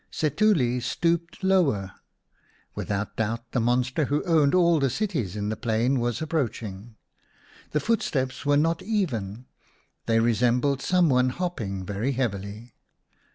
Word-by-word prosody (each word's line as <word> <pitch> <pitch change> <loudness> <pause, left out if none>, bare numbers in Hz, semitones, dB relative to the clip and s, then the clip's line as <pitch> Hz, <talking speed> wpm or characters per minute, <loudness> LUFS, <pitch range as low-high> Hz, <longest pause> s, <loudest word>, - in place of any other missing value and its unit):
Setuli 150 - +2
stooped 170 +7 -1
lower; 145 - +2 0.8
without 100 +1 -3
doubt 115 +1 -2
the 125 - 0
monster 125 +5 +1
who 145 +2 0
owned 160 -3 +3
all 170 -3 +4
the 135 -1 +2
cities 135 - -2
in 105 0 -2
the 110 - -1
plain 120 +4 0
was 120 +4 -1
approaching. 115 -8 -3 0.7
The 150 - 0
footsteps 135 - -1
were 145 0 +3
not 165 +2 +1
even; 125 - -2 0.6
they 115 0 +3
resembled 125 +4 +2
some 180 +1 +3
one 125 -2 +3
hopping 115 - -4
very 105 +8 -2
heavily. 110 -2 -4
125 Hz, 130 wpm, -26 LUFS, 115-160 Hz, 0.8 s, all